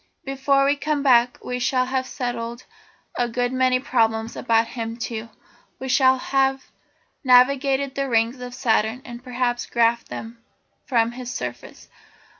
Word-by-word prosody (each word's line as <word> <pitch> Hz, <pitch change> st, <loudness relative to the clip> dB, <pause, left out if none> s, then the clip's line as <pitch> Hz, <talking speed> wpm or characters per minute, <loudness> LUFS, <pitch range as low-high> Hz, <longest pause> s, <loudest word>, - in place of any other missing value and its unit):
Before 275 Hz, 0 st, +2 dB
we 285 Hz, +1 st, +2 dB
come 295 Hz, -1 st, -1 dB
back 245 Hz, -2 st, +4 dB
we 250 Hz, 0 st, -3 dB
shall 255 Hz, +1 st, +1 dB
have 260 Hz, 0 st, -2 dB
settled 240 Hz, -1 st, -5 dB, 0.5 s
a 240 Hz, -1 st, +1 dB
good 245 Hz, +1 st, -1 dB
many 255 Hz, -1 st, +2 dB
problems 225 Hz, -3 st, 0 dB
about 230 Hz, -1 st, +1 dB
him, 230 Hz, -1 st, -5 dB
too. 230 Hz, -1 st, -5 dB, 0.5 s
We 265 Hz, -, -6 dB
shall 260 Hz, 0 st, +4 dB
have 270 Hz, 0 st, 0 dB, 0.5 s
navigated 265 Hz, +1 st, +4 dB
the 275 Hz, -1 st, -2 dB
rings 230 Hz, +2 st, +1 dB
of 245 Hz, 0 st, -7 dB
Saturn, 225 Hz, 0 st, 0 dB
and 240 Hz, 0 st, -9 dB
perhaps 245 Hz, -1 st, -2 dB
graphed 235 Hz, 0 st, +2 dB
them 230 Hz, +1 st, -8 dB, 0.4 s
from 235 Hz, -3 st, +2 dB
his 245 Hz, 0 st, -7 dB
surface. 125 Hz, -, -7 dB
250 Hz, 145 wpm, -23 LUFS, 230-265 Hz, 0.5 s, back